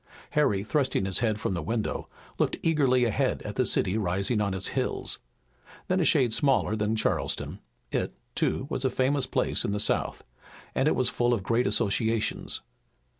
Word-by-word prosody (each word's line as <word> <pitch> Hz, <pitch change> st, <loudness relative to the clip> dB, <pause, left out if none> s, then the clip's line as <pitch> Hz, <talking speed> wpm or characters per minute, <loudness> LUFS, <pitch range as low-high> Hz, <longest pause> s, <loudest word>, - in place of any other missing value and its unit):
Harry, 105 Hz, -10 st, +2 dB
thrusting 130 Hz, -4 st, 0 dB
his 95 Hz, -1 st, +1 dB
head 110 Hz, -3 st, 0 dB
from 100 Hz, -, -1 dB
the 85 Hz, -, -2 dB
window, 110 Hz, +7 st, -2 dB, 0.3 s
looked -, -, +1 dB
eagerly 135 Hz, -6 st, +3 dB
ahead 115 Hz, -, +1 dB
at -, -, -6 dB
the -, -, +2 dB
city 100 Hz, +5 st, +2 dB
rising 100 Hz, +4 st, 0 dB
on 100 Hz, -1 st, 0 dB
its 95 Hz, -, -3 dB
hills. -, -, -1 dB, 0.7 s
Then 185 Hz, +1 st, +2 dB
a 170 Hz, -, +2 dB
shade 130 Hz, -9 st, +3 dB
smaller 135 Hz, -4 st, +2 dB
than 105 Hz, +1 st, 0 dB
Charleston, 110 Hz, -, -1 dB, 0.3 s
it, -, -, -1 dB, 0.2 s
too, -, -, 0 dB
was 135 Hz, -3 st, -3 dB
a 130 Hz, -, +3 dB
famous 130 Hz, +1 st, +1 dB
place -, -, 0 dB
in 100 Hz, -, -1 dB
the 105 Hz, -, -1 dB
South, -, -, 0 dB, 0.5 s
and 135 Hz, -, +2 dB
it -, -, +3 dB
was 125 Hz, -1 st, +2 dB
full 120 Hz, 0 st, +2 dB
of 100 Hz, -, -5 dB
great 115 Hz, +5 st, +1 dB
associations. 110 Hz, +2 st, 0 dB
115 Hz, 175 wpm, -27 LUFS, 105-130 Hz, 0.7 s, eagerly